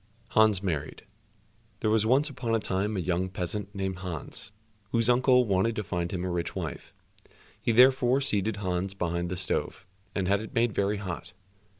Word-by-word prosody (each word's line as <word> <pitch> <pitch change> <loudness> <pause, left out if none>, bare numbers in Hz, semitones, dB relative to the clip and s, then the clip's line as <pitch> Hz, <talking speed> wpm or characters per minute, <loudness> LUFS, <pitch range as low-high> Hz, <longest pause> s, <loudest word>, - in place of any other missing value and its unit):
84 - - -17
Hans 105 -3 +3
Married 80 -5 -3 0.8
There 110 - +1
was 110 0 +3
once 135 +5 +4
upon 125 -5 -2
a - - +2
time 100 +1 -1
a - - 0
young 90 +1 -1
peasant 100 +3 -4
named 95 -1 -2
Hans, 90 - -6 0.4
whose 115 +2 +3
uncle 125 0 +4
wanted 100 +2 +1
to 105 - -2
find 85 -2 -3
him 90 -1 -3
a 90 - -2
rich 85 -1 -3
wife. - - -5 0.7
He - - +1
therefore 130 +2 +5
seated 110 -6 0
Hans 95 -1 -2
behind 85 -1 -2
the 90 - -3
stove, 95 +1 -2 0.3
and 95 -3 0
had 100 +2 +2
it 110 - -9
made 115 -2 +2
very 100 +2 0
hot. 95 -3 -6
100 Hz, 185 wpm, -28 LUFS, 90-115 Hz, 0.8 s, therefore